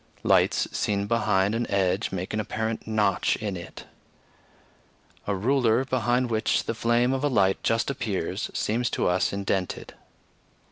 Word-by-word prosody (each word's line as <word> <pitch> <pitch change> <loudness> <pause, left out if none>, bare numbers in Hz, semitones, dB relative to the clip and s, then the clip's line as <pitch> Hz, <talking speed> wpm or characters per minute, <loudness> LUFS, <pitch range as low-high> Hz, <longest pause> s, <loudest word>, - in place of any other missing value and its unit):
Lights - - +3
seen 100 -1 0
behind 105 -3 +1
an 115 +1 -2
edge 95 +1 +1
make 95 +1 -4
an 110 - -1
apparent 110 +1 -3
notch 105 -3 +1
in 105 -3 -4
it. 85 -1 -9 1.4
A 100 - 0
ruler, 120 +3 +2
behind 125 -1 0
which 110 -1 +1
the - - -2
flame 120 +3 +2
of 135 +1 -2
a - - +3
light 95 -7 +2
just 115 +3 +1
appears, 105 -6 -3
seems 120 +3 -1
to - - 0
us 90 +1 +1
indented. 100 -2 -3
110 Hz, 145 wpm, -26 LUFS, 100-120 Hz, 1.4 s, Lights